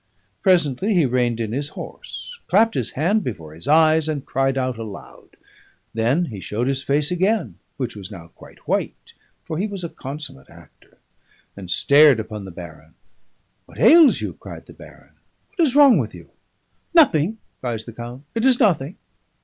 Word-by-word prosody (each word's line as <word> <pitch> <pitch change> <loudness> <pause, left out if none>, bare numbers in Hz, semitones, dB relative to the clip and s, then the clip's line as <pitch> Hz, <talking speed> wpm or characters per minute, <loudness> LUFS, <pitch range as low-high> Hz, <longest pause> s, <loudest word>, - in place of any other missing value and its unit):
Presently 185 - +2
he 170 -5 +4
reined 120 -2 0
in 110 -2 -3
his 140 +4 -2
horse, 480 - -9
clapped 225 +4 +3
his 125 - -3
hand 190 +9 +1
before 80 - -6
his 80 +2 -11
eyes, 155 0 +4
and 145 -3 -3
cried 135 0 0
out 130 -3 -2
aloud. 105 -3 -11 0.6
Then 120 +10 +1
he 105 - -8
showed 105 +7 -3
his 135 0 -1
face 145 +4 0
again 190 +2 0 0.2
(which 125 -5 -4
was 100 -3 -8
now 85 -5 -11
quite - - -18
white, - - -3 0.3
for 160 -1 -5
he 205 - 0
was 200 -3 -7
a 170 - -4
consummate 135 -1 -8
actor), 85 -3 -20 0.6
and 95 -3 -10
stared 140 - +5
upon 105 -2 -6
the - - -8
baron. 80 -3 -12 0.7
'What - - -16
ails 325 -4 +6
you?' - - -4
cries - - -11
the - - -14
baron. - - -16 0.4
'What 345 -6 +2
is 265 - -2
wrong 285 -4 +7
with - - -4
you?' - - -14 0.6
'Nothing,' 220 - +4 0.2
cries 115 -3 -4
the 115 - -10
count. 120 +3 -9
'It 230 - -2
is 260 -2 +4
nothing. 175 - +1
140 Hz, 175 wpm, -21 LUFS, 115-180 Hz, 0.7 s, wrong